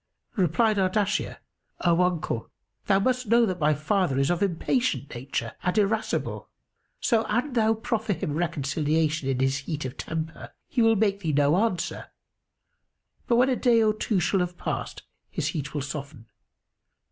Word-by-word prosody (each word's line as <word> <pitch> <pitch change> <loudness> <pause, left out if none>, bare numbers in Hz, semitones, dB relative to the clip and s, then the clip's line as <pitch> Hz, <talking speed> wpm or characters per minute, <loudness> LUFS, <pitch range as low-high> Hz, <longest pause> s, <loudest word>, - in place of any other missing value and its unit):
Replied 210 +3 +2
Ardashir, 200 +2 0 0.4
"O 170 0 +3
uncle, 175 -10 -1 0.4
thou 195 - +4
must 250 +3 0
know 235 +2 +5
that 185 -4 -2
my 150 0 +3
father 155 -1 0
is 135 +4 +2
of 175 - -1
impatient 185 - 0
nature, 120 -2 -4
and 180 +3 -1
irascible; 215 +1 0 0.5
so 225 -3 +2
an 245 +6 -1
thou 225 -2 +3
proffer 225 -2 -1
him 155 -3 -3
reconciliation 155 -2 0
in 130 -1 0
his 135 +1 +2
heat 145 +1 -4
of 130 +1 -6
temper 160 -1 -5
he 245 - 0
will 225 0 +5
make 200 -1 +1
thee 160 -6 -2
no 145 +2 +4
answer; 195 -2 -1 1.2
but 235 - +3
when 250 +3 +4
a 255 - +2
day 235 -2 +4
or 215 -1 +3
two 215 -2 0
shall 185 +3 +1
have 180 0 -2
passed, - - -4 0.3
his 155 -6 -2
heat 145 -2 -4
will 145 - -1
soften. 140 -4 -7
180 Hz, 160 wpm, -26 LUFS, 150-220 Hz, 1.2 s, know